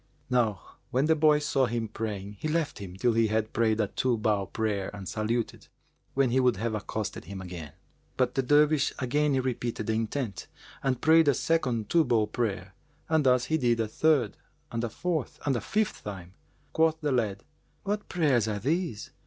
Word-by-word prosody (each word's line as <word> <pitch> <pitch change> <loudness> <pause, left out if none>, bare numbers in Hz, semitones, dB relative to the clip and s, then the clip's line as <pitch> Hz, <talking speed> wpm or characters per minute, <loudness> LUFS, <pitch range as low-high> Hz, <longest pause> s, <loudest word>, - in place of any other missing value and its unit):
Now 115 -7 0
when 130 +3 +1
the 160 +1 +4
boy 155 -1 +5
saw 140 -3 +1
him 115 -1 -2
praying, 105 -2 -5
he - - -2
left 155 -4 -1
him 95 -3 -8
till 120 +5 +2
he 115 0 +3
had 110 0 -1
prayed 110 -1 +2
a 110 - +3
two 120 +4 0
bow 105 -3 0
prayer 105 -3 -2
and 100 -2 -8
saluted,[FN#392] 110 +6 -2 0.5
when 135 -2 +3
he 130 - +3
would 125 -5 +3
have 115 +2 -2
accosted 105 0 -4
him 100 -1 -7
again; 90 -5 -8 0.4
but - - +1
the 135 - +1
Dervish 145 +2 +3
again 140 +2 +1
repeated 120 -3 -2
the 110 - 0
intent[FN#393] 115 0 -3 0.3
and 130 -2 0
prayed 160 0 +5
a 140 - +5
second 130 - 0
two 170 -1 +4
bow 120 -5 +2
prayer, 100 -4 -3 0.4
and 160 -4 +3
thus 125 -1 +4
he 160 0 0
did 120 -3 +2
a 110 - +1
third 135 -1 +2 0.3
and 115 0 -2
a 120 - -1
fourth 160 - -3
and 140 -3 +2
a 120 - -1
fifth 215 - -1
time. 95 -3 -7 0.4
Quoth 160 0 +3
the 150 -2 0
lad, 110 -6 0 0.4
"What 205 +1 -3
prayers 140 - +2
are 105 -1 -1
these? 150 - -2
120 Hz, 190 wpm, -28 LUFS, 105-145 Hz, 0.5 s, boy